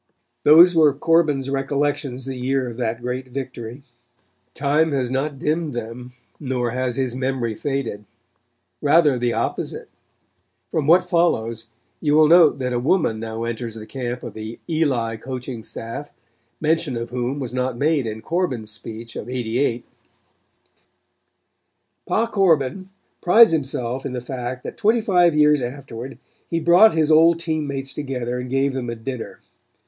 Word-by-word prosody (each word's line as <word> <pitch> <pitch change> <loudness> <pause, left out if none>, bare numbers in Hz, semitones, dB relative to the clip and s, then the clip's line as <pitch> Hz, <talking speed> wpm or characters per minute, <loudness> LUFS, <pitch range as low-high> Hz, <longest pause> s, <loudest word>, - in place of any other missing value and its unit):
Those 170 +4 +7
were 155 -4 +4
Corbin's 150 -3 +2
recollections 135 -1 -2
the 135 -1 -5
year 130 +1 -1
of 115 -2 -7
that 120 -1 -3
great 125 +1 -3
victory. 130 -1 -7 0.7
Time 150 +2 +1
has 130 -3 -1
not 140 +2 -2
dimmed 155 +1 -1
them, 120 +2 -7 0.3
nor 125 -4 -2
has 125 -1 -2
his 130 -3 -1
memory 130 -3 -2
faded. 120 -5 -3 0.8
Rather 145 -3 +4
the 120 -1 0
opposite. - - -3 0.8
From 155 -3 -1
what 180 +3 +5
follows 115 - 0 0.3
you 150 -2 +1
will 155 0 +6
note 165 -2 +6
that 125 -2 -2
a 120 - 0
woman 130 -4 +1
now 110 0 -5
enters 115 -1 -4
the 110 -1 -8
camp 125 +1 -5
of 120 - -7
the 110 +1 -7
Eli 130 -9 0
coaching 125 0 -6
staff, 115 +5 -7 0.5
mention 155 -4 0
of 115 0 -5
whom 125 +2 -2
was 125 -3 -5
not 125 -1 -2
made 145 -2 +1
in 110 0 -5
Corbin's 135 -11 -2
speech 115 +1 -7
of 115 - -6
'88. 120 0 -1 2.2
Pa 225 - +2
Corbin 185 - +1 0.3
prides 225 +5 +7
himself 130 -4 -2
in 135 - -4
the 125 - -2
fact 125 0 -5
that - - -7
twenty 225 +2 +3
five 175 -6 +3
years 150 -1 +4
afterward 125 0 -7 0.3
he 165 - 0
brought 175 +5 +6
his 160 -1 +2
old 165 +2 +6
team 160 -3 -2
mates 135 -1 -4
together 125 -4 -3
and 125 0 -6
gave 135 +1 +1
them 125 -2 -3
a 115 - -3
dinner. 120 +1 -7
130 Hz, 155 wpm, -22 LUFS, 120-155 Hz, 2.2 s, Those